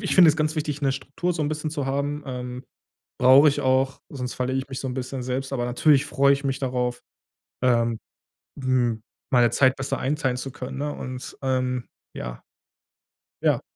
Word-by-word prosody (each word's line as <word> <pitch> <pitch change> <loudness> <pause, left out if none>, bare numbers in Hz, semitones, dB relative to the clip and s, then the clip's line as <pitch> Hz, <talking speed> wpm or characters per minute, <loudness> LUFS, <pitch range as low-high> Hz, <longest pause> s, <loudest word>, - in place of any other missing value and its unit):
ich 195 - -1
finde 180 -3 +8
es 155 - +4
ganz 155 0 0
wichtig, 150 -1 -2
'ne 135 - +3
Struktur, 140 +6 -3
so 165 - -4
'n 145 - 0
bisschen 155 0 -3
zu 145 -3 -3
haben, 140 +2 -1
ähm, 125 -1 -5 0.6
brauche 135 +4 +8
ich 145 - -1
auch, 130 0 +2
sonst 125 -3 -5
verliere 130 +1 -1
ich 135 - -7
mich 130 - -5
so 135 - -4
'n 125 - -3
bisschen 130 0 -4
selbst, 130 +2 -3
aber 125 -3 -1
natürlich 135 +3 +3
freue 140 0 +3
ich 140 +1 -2
mich 135 0 -1
darauf, 125 -2 -1 0.6
ähm, 115 -2 +2 0.6
hm, 125 -4 +1 0.3
meine 120 -2 +5
Zeit 130 +2 +4
besser 135 0 -2
einteilen 135 -1 0
zu 135 +1 -5
können, 130 -1 -7
ne? 145 +1 -1
Und, 130 0 -7
ähm 130 -2 0 0.3
ja. - - -6 1.0
Ja. - - +2
130 Hz, 190 wpm, -25 LUFS, 125-140 Hz, 1.0 s, finde